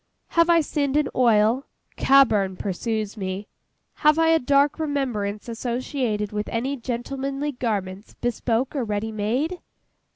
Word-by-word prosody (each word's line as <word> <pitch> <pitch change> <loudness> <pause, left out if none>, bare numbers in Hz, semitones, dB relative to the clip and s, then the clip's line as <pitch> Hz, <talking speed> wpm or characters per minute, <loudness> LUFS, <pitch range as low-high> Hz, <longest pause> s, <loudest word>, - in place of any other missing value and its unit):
Have 335 0 +3
I 335 -1 +6
sinned 290 -2 0
in 300 -2 +1
oil? 235 +1 +3 0.3
CABBURN 215 -9 +4
pursues 215 +2 -3
me. 190 +1 -4 0.5
Have 305 0 +4
I 325 0 +4
a 325 0 +5
dark 280 +3 +2
remembrance 245 -10 -2
associated 235 -2 -2
with 210 0 -3
any 255 +5 -1
gentlemanly 270 +3 -3
garments, 205 -6 -4
bespoke 240 +2 -1
or 270 - 0
ready 210 0 -2
made? 250 - -1
245 Hz, 130 wpm, -24 LUFS, 210-280 Hz, 0.5 s, I